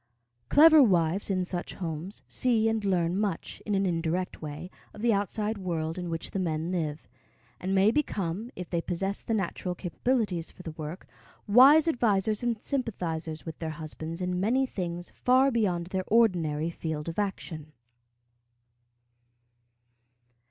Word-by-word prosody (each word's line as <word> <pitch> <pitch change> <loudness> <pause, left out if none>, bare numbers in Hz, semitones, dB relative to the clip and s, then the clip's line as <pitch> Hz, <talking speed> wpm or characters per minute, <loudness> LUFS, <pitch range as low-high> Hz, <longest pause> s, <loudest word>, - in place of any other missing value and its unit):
Clever 315 +1 +8
wives 180 - +2
in 185 -2 0
such 175 -1 -4
homes 170 +2 -5
see 230 -3 +2
and 220 -1 0
learn 180 -3 +1
much, 200 -4 -3
in 210 - +1
an 195 0 +2
indirect 175 +1 -1
way, 155 +4 -7 0.2
of 210 - -9
the 235 -2 +4
outside 210 +2 -1
world 165 -2 -2
in 175 -1 -4
which 165 0 -4
the 195 - -2
men 165 -1 -1
live; 155 -4 -3 0.5
and 190 +1 -1
may 195 +3 +5
become, 210 - -2
if 180 - -6
they 170 -1 -1
possess 195 +4 -2
the 225 - -1
natural 180 -2 -2
capabilities 185 -1 -1
for 180 - -14
the 165 - -5
work, 155 +3 -7 0.4
wise 275 +9 +7
advisers 215 - +1
and 235 -3 -2
sympathizers 170 - -3
with 160 -2 -7
their 160 - -3
husbands 160 +2 -6
in 180 0 -1
many 245 +8 +2
things 175 -6 -5
far 260 +2 +3
beyond 190 -8 0
their 185 +1 -2
ordinary 170 -8 +2
field 160 -2 -4
of 165 +4 -3
action. 160 -6 -4
185 Hz, 150 wpm, -28 LUFS, 165-215 Hz, 0.5 s, Clever